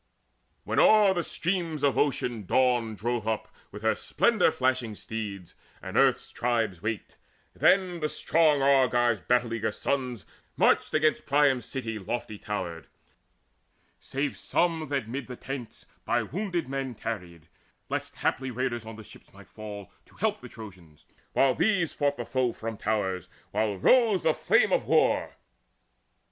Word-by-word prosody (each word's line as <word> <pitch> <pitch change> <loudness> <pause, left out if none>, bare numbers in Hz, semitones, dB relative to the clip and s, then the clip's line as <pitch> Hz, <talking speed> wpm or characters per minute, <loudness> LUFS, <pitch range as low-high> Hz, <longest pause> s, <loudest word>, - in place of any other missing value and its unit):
When - - 0
o'er 210 -3 +6
the 175 - 0
streams 170 -3 -2
of 140 -2 +3
Ocean 120 -7 0
Dawn 120 -4 +2
drove 115 +1 -2
up 110 -1 -2 0.2
Her 110 +2 0
splendour 225 -8 +2
flashing 130 -5 0
steeds, 100 -5 -6 0.3
and - - -8
earth's - - +3
tribes 115 -7 -1
waked, 110 +1 -4 0.3
Then 185 -3 +3
the 155 -1 -1
strong 155 -4 +2
Argives' 120 -5 +3
battle 120 +6 +1
eager 110 -1 -1
sons 125 -9 -2 0.3
Marched - - +3
against 155 -1 +2
Priam's 140 -4 +3
city 115 -5 -4
lofty 110 +1 -4
towered, 85 -7 -5 1.1
Save 140 +2 -3
some 165 -3 0
that 135 -5 -2
mid 130 +2 -5
the 125 - -7
tents 125 -3 -7 0.2
by - - +1
wounded 175 - -3
men 135 -2 -4
Tarried, 90 -8 -6 0.4
lest - - -4
haply 130 0 -1
raiders 120 -2 -3
on 110 - -7
the 110 - -10
ships - - -15
Might - - -16
fall, 105 -2 -9 0.2
to - - -22
help - - -1
the - - -10
Trojans, 90 -9 -13 0.3
while 135 -1 +4
these 175 - +1
fought 145 0 0
The - - -4
foe 130 -3 0
from 115 0 -5
towers, 95 -4 -2 0.2
while 105 -3 0
rose 225 - +4
the 160 - +3
flame - - +3
of - - +2
war. - - +2
125 Hz, 150 wpm, -27 LUFS, 110-145 Hz, 1.1 s, o'er